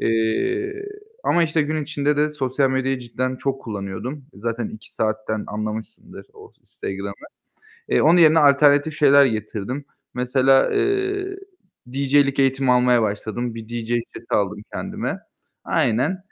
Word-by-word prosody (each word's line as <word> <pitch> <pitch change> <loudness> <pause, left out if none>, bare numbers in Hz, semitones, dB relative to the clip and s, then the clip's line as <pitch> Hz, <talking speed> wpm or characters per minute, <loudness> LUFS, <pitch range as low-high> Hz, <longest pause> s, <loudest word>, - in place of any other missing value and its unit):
Eee, 380 - 0 0.4
ama 175 - +3
işte 160 -1 +1
gün 155 +1 -2
içinde 145 0 0
de 150 0 +1
sosyal 135 -1 0
medyayı 130 0 0
cidden 130 +2 -3
çok 135 +1 -2
kullanıyordum. 110 +6 -6
Zaten 115 +2 -3
2 110 - -11
saatten 110 -1 -2
anlamışsındır 110 +1 -6
o - - -15
Instagram'ı. 100 +1 -7 0.6
Eee, - - +3
onun 170 +3 +5
yerine 160 -1 +6
alternatif 145 +1 +4
şeyler 140 -1 +6
getirdim. 110 +4 -4 0.3
Mesela, 130 +1 +3
eee, 390 -1 0 0.5
DJ'lik 140 +2 +2
eğitimi 135 -1 +2
almaya 125 -1 +4
başladım. 110 +3 -3
Bir 115 -1 -9
DJ 120 -1 -5 0.3
seti 115 - -5
aldım 105 0 0
kendime. - - -4 0.5
Aynen. 130 +12 +1
130 Hz, 130 wpm, -22 LUFS, 110-150 Hz, 0.6 s, yerine